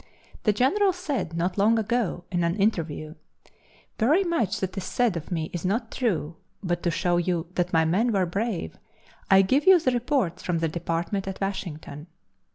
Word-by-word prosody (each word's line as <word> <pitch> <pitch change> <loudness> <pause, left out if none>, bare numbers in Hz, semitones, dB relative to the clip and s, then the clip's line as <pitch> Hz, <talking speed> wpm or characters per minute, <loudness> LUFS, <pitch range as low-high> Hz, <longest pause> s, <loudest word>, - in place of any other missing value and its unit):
The 210 - +5
General 370 - +2
said 290 - -3
not 180 +3 -1
long 220 +3 +4
ago 220 -5 -1
in 175 -1 0
an 170 +1 +1
interview: 165 -7 -1 0.9
"Very 300 - +4
much 245 - 0
that 190 0 -3
is 195 - -3
said 230 +1 +1
of 165 -2 -6
me 165 -3 -3
is 175 - -4
not 225 +5 -1
true, 170 - -1 0.3
but 175 -2 -1
to 175 - 0
show 175 +1 +1
you 175 -1 0
that 175 -1 -1
my 160 -1 +3
men 205 +9 +2
were 195 -3 +2
brave, 195 - -3 0.5
I 195 0 +7
give 270 - +1
you 375 -2 +8
the 280 -6 +1
reports 240 - 0
from 175 -2 -1
the 165 0 0
department 170 +4 -2
at 190 - -5
Washington." 170 -6 -5
190 Hz, 180 wpm, -26 LUFS, 170-235 Hz, 0.9 s, you